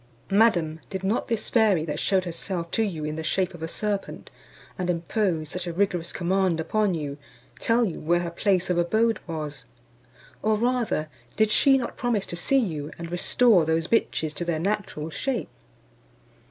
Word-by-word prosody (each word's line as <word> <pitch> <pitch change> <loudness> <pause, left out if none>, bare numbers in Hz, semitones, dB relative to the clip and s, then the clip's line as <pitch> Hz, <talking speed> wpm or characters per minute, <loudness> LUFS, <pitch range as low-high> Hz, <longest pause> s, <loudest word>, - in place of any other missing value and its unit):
"Madam, 175 -7 +3
did 190 0 -5
not 200 +4 0
this 230 -2 -2
fairy, 210 -9 +4
that 150 -1 -3
shewed 190 -2 +2
herself 170 0 -4
to - - +1
you 170 -8 -2
in 155 +1 -3
the 160 - -3
shape 185 +3 0
of 170 - -11
a 160 - -2
serpent, 205 +3 -4 0.4
and 180 -1 -3
imposed 170 -2 0
such 180 -1 -4
a 170 - -3
rigorous 180 -2 0
command 185 -1 +1
upon 205 +3 +1
you, 145 -2 -4 0.4
tell 235 +1 +3
you 180 - -4
where 175 +3 +2
her 170 -1 -3
place 185 0 +1
of 175 - +2
abode 220 +6 +2
was? 150 -6 -5 0.8
Or 215 +1 +2
rather, 235 -9 0 0.3
did 220 -1 +3
she 270 +4 +5
not 245 -3 -4
promise 235 -5 0
to - - -6
see 225 +10 +2
you, 155 - -1
and 170 0 -7
restore 190 +2 +4
those 160 +1 +1
bitches 160 -7 0
to - - -2
their 170 -2 -1
natural 185 -4 -2
shape?" 265 +4 -2
180 Hz, 180 wpm, -26 LUFS, 165-215 Hz, 0.8 s, she